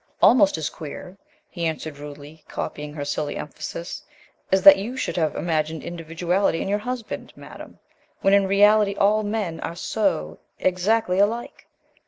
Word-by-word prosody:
"Almost 200 -8 +5
as 155 -1 -3
queer," 165 +4 -9 0.3
he 170 -3 -3
answered 155 -2 -5
rudely, 150 +1 -11
copying 150 0 -5
her 145 -2 -4
silly 145 0 -2
emphasis, 170 +3 -6 0.5
"as 190 0 +3
that 195 0 +10
you 230 +7 -5
should - - -2
have 160 -3 0
imagined 160 -1 -1
individuality 170 +2 -1
in - - -3
your 205 +1 0
husband, 245 +1 -5
Madame, - - -12 0.4
when 195 - +3
in 200 -1 +4
reality 205 +1 +4
all 210 +2 +3
men 205 -6 -3
are 170 - -5
so 125 - -1 0.2
exactly 185 +1 +1
alike!" 225 +4 -1
180 Hz, 150 wpm, -23 LUFS, 160-205 Hz, 0.5 s, that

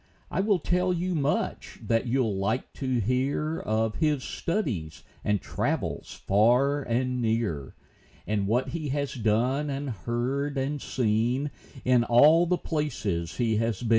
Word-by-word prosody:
I - - -1
will 205 -1 +3
tell 180 +2 +1
you 180 +1 -1
much 150 -2 -1
that 115 +2 +1
you'll 120 -4 +1
like 100 +6 -1
to 130 -3 -1
hear 135 +7 0
Of 110 0 -1
his 150 -4 +1
studies 100 - -3 0.2
and 105 -1 +1
travels - - -3
far 125 +8 +4
and 125 0 -1
near, 110 - -1 0.5
And 105 -2 0
what 120 +5 +1
he 155 -3 -4
has 140 0 -1
done, 125 +5 +1
and 140 -1 -3
heard, 125 +7 -2
and 140 +2 -1
seen, 125 +4 0 0.3
In 125 -2 +4
all 150 +9 +6
the 180 +1 +2
places 105 - -2
he 115 -3 +1
has 115 0 -1
been. 115 - -2
125 Hz, 145 wpm, -27 LUFS, 110-145 Hz, 0.5 s, all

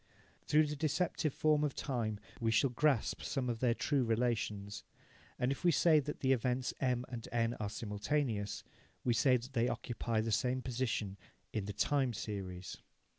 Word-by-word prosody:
Through 155 +1 +5
the 150 0 -3
deceptive 155 +1 0
form 150 +1 +2
of 145 -3 0
time, 115 -6 -2 0.2
we 115 -2 +1
shall 120 +4 +3
grasp 135 -2 +1
some 130 -3 -2
of 115 - -4
their 120 -2 +2
true 140 -1 +1
relations. 110 -3 -1 0.6
If 135 +5 0
we 175 - +5
say 155 +1 +5
that 150 +1 -5
the 130 - +3
events 125 +1 0
M 125 -2 +1
and 120 -3 -6
N 115 0 +1
are 105 -2 -2
simultaneous, 105 +1 -2 0.4
we 120 - +2
say 125 +4 +4
that 125 +3 -9
they 120 -1 +2
occupy 115 -1 -2
the 115 0 -2
same 125 +4 +1
position 115 -6 -2 0.4
in 105 -3 -1
the 105 - -4
time 135 +2 +1
series. 95 -4 -5
125 Hz, 170 wpm, -35 LUFS, 110-135 Hz, 0.6 s, Through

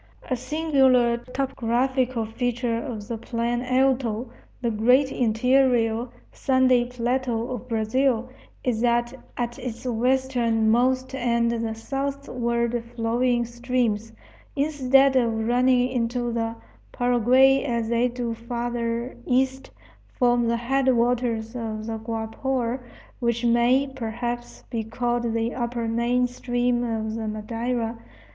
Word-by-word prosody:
A - - +3
singular 260 -3 +3
topographical 255 -1 -1
feature 240 +1 -1
of 220 -7 -6
the 230 -2 -4
Plan 235 +1 -2
Alto, 255 -2 +1 0.3
the 235 -2 -1
great 250 +5 +3
interior 240 0 +2 0.2
sandy 260 -2 +3
plateau 245 -1 -1
of 250 -1 -5
Brazil, 235 +2 +1 0.4
is 235 -3 0
that 240 0 +1 0.2
at 240 +1 -3
its 245 -1 -6
westernmost 250 0 +1
end 235 -2 +1
the 225 -1 -2
southward 240 -2 -2
flowing 240 +1 +1
streams, 240 -2 -1 0.4
instead 275 -2 +3
of 230 -3 +1
running 250 +1 +3
into 240 -1 -1
the 225 0 -2 0.4
Paraguay 250 +3 +4
as 235 -4 -1
they 235 +1 +2
do 240 -1 -3
farther 235 +1 -3
east, 265 +1 +1 0.5
form 240 -1 +3
the 235 0 +1
headwaters 240 -2 +1
of 220 -2 -4
the 225 0 -4
Guapore, 230 +3 -2 0.4
which 235 0 0
may, 240 +3 +4
perhaps, 240 -2 -5
be 230 -2 -2
called 240 +1 -1
the 230 +1 -1
upper 235 -2 -2
main 235 +2 +1
stream 245 0 -1
of 220 -2 -2
the 225 -1 -4
Madeira. 230 +2 -3
240 Hz, 115 wpm, -24 LUFS, 230-255 Hz, 0.5 s, Paraguay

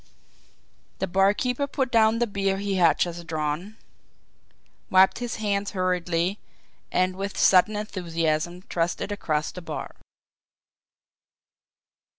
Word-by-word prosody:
The - - -1
barkeeper 205 +9 +1
put 265 -2 -2
down 225 -1 +4
the 240 - +2
beer 195 -2 -1
he 200 0 -2
had 165 -4 +4
just 170 -1 -2
drawn, 160 +6 -3 1.1
wiped 190 +3 +5
his 240 -2 -3
hand 205 -2 -1
hurriedly, 180 0 -1 0.5
and 185 0 +1
with 195 +1 -5
sudden 195 +3 +5
enthusiasm 175 -4 -2
thrust 170 -1 -1
it - - -3
across 155 -7 -1
the 180 - -9
bar. 170 - -6
190 Hz, 115 wpm, -25 LUFS, 170-210 Hz, 1.1 s, wiped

